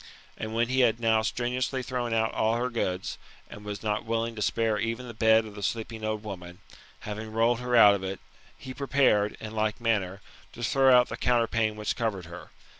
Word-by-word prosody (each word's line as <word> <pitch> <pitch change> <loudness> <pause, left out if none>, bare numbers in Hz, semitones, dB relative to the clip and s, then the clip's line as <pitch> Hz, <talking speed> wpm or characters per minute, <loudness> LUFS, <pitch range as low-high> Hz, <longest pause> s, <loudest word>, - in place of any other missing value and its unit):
And 110 +1 -5
when 115 +1 +2
he 130 +1 0
had 115 -3 +3
now 110 -1 +3
strenuously 125 +3 -2
thrown 125 -2 -3
out 110 0 +1
all 110 +1 +1
her 125 +2 -1
goods, 95 -5 -3 0.3
and 105 - -10
was 105 0 -6
not 105 -1 -1
willing 115 0 -2
to 105 - -6
spare 110 0 +1
even 115 +3 -3
the 120 - -8
bed 110 0 +4
of 105 - -10
the 105 - -9
sleeping 110 +1 -3
old 110 0 -2
woman, 90 -4 -8 0.4
having 110 +1 -6
rolled 115 +2 +2
her 125 0 -1
out 105 -3 +8
of 100 -1 -3
it, 95 0 -4 0.4
he 130 - -8
prepared, 130 -6 +2
in 110 - -7
like 110 +1 -1
manner, 100 -5 0 0.3
to 120 - -8
throw 135 +3 +4
out 125 - +3
the - - -5
counterpane 115 -3 +1
which 105 -1 -2
covered 110 -7 -2
her. 85 +2 -10
110 Hz, 205 wpm, -27 LUFS, 105-120 Hz, 0.4 s, out